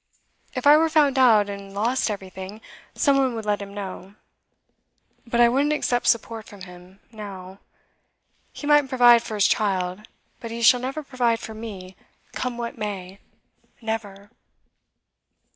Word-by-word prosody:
If - - -4
I 295 +1 +8
were 325 +1 +2
found 290 -4 +3
out, 220 -5 +5
and 200 -1 -8
lost 235 +5 0
everything, 190 0 -7 0.4
some 280 -4 +3
one 260 -3 +1
would 220 -1 -5
let 205 -1 0
him 200 0 -8
know. 195 -1 -8 1.1
But 235 0 -1
I 240 - +7
wouldn't 280 +5 +1
accept 245 -5 -1
support 230 -1 0
from 200 -2 -13
him, 180 +1 -13
now. 195 -3 -9 0.9
He - - -9
might 295 -2 +4
provide 240 -2 +6
for 220 - -6
his 205 - +3
child, 185 -2 0 0.4
but 230 - -7
he 230 +1 -5
shall 250 +2 +6
never 270 +5 -4
provide 245 -4 0
for 220 - -8
me, 200 -4 -9 0.4
come 250 -2 -3
what 235 -1 -6
may 195 -2 -6 0.6
never! 205 -2 -6
220 Hz, 150 wpm, -23 LUFS, 200-250 Hz, 1.1 s, I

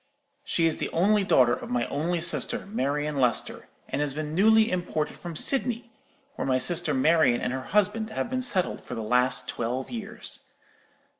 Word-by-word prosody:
She 170 -10 0
is 160 - +1
the - - -3
only 200 +4 +2
daughter 125 -10 +4
of - - -5
my 120 -1 0
only 165 +3 -2
sister, 170 +1 +1
Marian 150 -6 -2
Lester, 125 -3 0 0.2
and - - -2
has 145 -2 -2
been 155 0 -4
newly 220 +5 +4
imported 175 -4 -2
from 170 -2 -8
Sydney, 240 - 0 0.5
where - - -3
my 130 -1 +2
sister 170 +6 +1
Marian 135 -3 +3
and 125 - -2
her 130 -1 -5
husband 210 +2 +1
have 220 - -3
been 255 +1 -2
settled 210 -8 +1
for 125 - -8
the 115 - -4
last 125 +2 +2
twelve 125 +3 -3
years. 225 -1 -7
160 Hz, 175 wpm, -26 LUFS, 130-210 Hz, 0.5 s, daughter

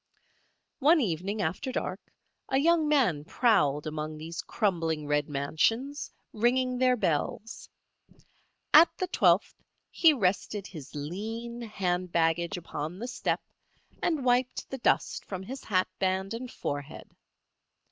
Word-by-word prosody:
One 310 +4 +5
evening 200 - -1
after 190 - -2
dark - - -3 0.5
a 265 - +2
young 320 +2 +3
man 240 - +2
prowled 150 - +2
among 155 0 -4
these 165 +3 -6
crumbling 165 -7 -1
red 145 0 0
mansions, 225 - 0 0.2
ringing 250 +3 +2
their 255 -1 +4
bells. 190 +5 -2 1.0
At 320 +3 +9
the 370 - 0
twelfth 365 - +3 0.4
he 330 - +6
rested 200 -4 0
his 155 -6 -10
lean 225 +10 -5
hand 185 -5 -2
baggage 170 +3 +1
upon 160 0 -5
the 235 +5 -5
step 250 - -2 0.6
and 310 -6 0
wiped 250 +1 +1
the 265 - -4
dust - - +1
from 190 -1 -6
his 260 +7 -7
hatband 190 0 0
and 245 +2 -6
forehead. 145 +1 -5
195 Hz, 125 wpm, -29 LUFS, 165-250 Hz, 1.0 s, At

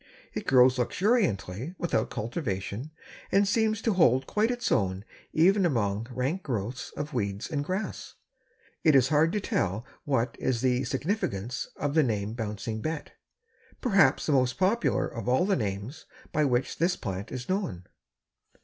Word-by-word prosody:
It - - -5
grows 130 -1 +5
luxuriantly 155 - 0
without 165 -10 0
cultivation 110 - -4 0.4
and 200 0 +4
seems 220 +1 +1
to 225 - +2
quite 130 -8 +4
hold 220 +2 +4
its 245 -1 -1
own 95 -3 +1 0.3
even 190 +5 +4
among 115 - 0
rank 130 +9 -2
growths 120 - -3
of 150 0 -4
weeds 100 - -2
and 145 -2 -1
grass. 185 +7 -4 0.7
It 155 -3 +5
is 130 -1 +5
hard 155 +2 +4
to 210 - +1
tell 105 - -1 0.2
what 130 -4 0
is 125 -3 0
the 130 0 +1
significance 125 - -2
of 145 0 -2
the 160 - +5
name 105 -5 -1
Bouncing 110 -1 -4
Bet, 155 +2 -4 0.7
perhaps 200 -7 +3
the - - 0
most 130 -2 +2
popular 200 +6 +2
of 115 0 -5
all 130 +8 +3
the 195 -1 +2
names 105 +4 -4 0.2
by 150 0 +2
which 125 -2 0
this 175 +3 +2
plant 95 -3 -5
is 125 -1 -5
known. 185 - -2
130 Hz, 155 wpm, -28 LUFS, 110-175 Hz, 0.7 s, grows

